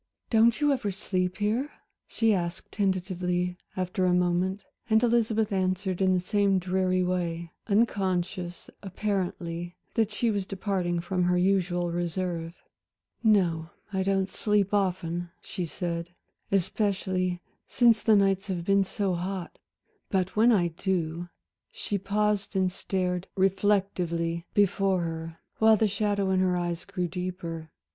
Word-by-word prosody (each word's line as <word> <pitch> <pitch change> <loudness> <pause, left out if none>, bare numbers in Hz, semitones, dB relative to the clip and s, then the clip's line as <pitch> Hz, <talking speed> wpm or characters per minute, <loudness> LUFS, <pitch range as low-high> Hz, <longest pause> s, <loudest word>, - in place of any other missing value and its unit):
"Don't 230 +2 +5
you 295 -1 +3
ever 245 -6 -1
sleep 185 -1 -2
here?" 220 +7 0 0.4
she 225 -1 +2
asked 170 -2 -3
tentatively 180 -2 -1 0.2
after 185 0 0
a 180 - +3
moment, 180 +2 +1 0.3
and 220 +1 +4
Elizabeth 225 -2 +2
answered 185 -1 0
in 185 -1 +4
the - - +2
same 200 +1 +2
dreary 185 0 +1
way, 170 -2 -2 0.2
unconscious, 190 -4 0
apparently, 180 -3 -3 0.2
that 220 -2 +2
she 220 +2 0
was 200 -2 -2
departing 190 -3 -1
from 180 0 0
her 180 0 +2
usual 180 -2 +1
reserve. 170 -1 -2 0.7
"No, 175 -7 +3 0.2
I 190 - +1
don't 195 0 +1
sleep 205 0 +1
often," 175 -3 0
she 180 - -4
said, 170 +1 -4 0.4
"especially 185 -2 0 0.3
since 235 -3 +4
the 220 - +5
nights 195 0 +2
have 175 -3 -3
been 195 +1 +4
so 195 0 -1
hot. 180 0 -4 0.5
But 190 -1 0
when 225 +3 +5
I 180 -6 +3
do" 170 -1 -2 0.4
she 405 - -3
paused 205 +1 0
and 185 -1 +2
stared 180 -1 -2
reflectively 185 -4 +1
before 195 -2 +3
her, 165 0 -5 0.2
while 220 0 +6
the 220 - +3
shadow 205 -1 0
in 190 - +3
her 185 -1 +2
eyes 175 -1 -3
grew 180 -2 -2
deeper. 170 -2 -5
185 Hz, 135 wpm, -28 LUFS, 175-200 Hz, 0.7 s, while